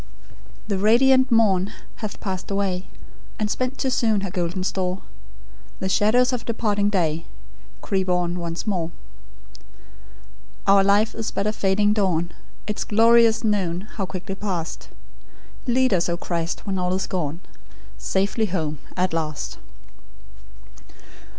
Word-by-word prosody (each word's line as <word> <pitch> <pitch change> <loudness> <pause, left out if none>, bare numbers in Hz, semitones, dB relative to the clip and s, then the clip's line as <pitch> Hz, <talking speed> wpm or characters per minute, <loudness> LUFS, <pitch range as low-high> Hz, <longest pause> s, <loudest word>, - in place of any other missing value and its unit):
"The 200 -3 -1
radiant 260 +5 +5
morn 205 -4 +3 0.3
hath 215 -3 -5
passed 185 -2 -4
away, 195 -2 -1 0.5
And 210 -1 -1
spent 255 +1 -2
too 265 - 0
soon 220 -5 +2
her 195 -2 -4
golden 180 0 -2
store; 185 0 -2 0.8
The 190 - -2
shadows 240 +7 +3
of 245 - -2
departing 205 -3 0
day 165 -5 0 0.5
Creep 190 -3 -1
on 180 0 0
once 170 0 -4
more. 180 -6 -1 1.8
"Our 195 -1 +6
life 205 +2 +3
is 225 -1 -3
but 200 - -2
a 215 - +1
fading 205 +1 +2
dawn, 175 -5 0 0.3
Its 210 - -2
glorious 230 +1 +5
noon, 190 -5 0
how 200 -2 -5
quickly 185 +1 -5
past! 185 -5 -4 0.8
Lead 255 -1 +3
us, 175 -1 +2
O 170 - 0
Christ, 170 -1 -3
when 195 -2 -1
all 180 0 0
is 190 - -1
gone, 165 -3 -3 0.6
Safe 195 +1 0 0.2
home 155 -5 -2 0.2
at 185 -1 +1
last. 155 -3 -3
195 Hz, 130 wpm, -23 LUFS, 180-215 Hz, 1.8 s, Our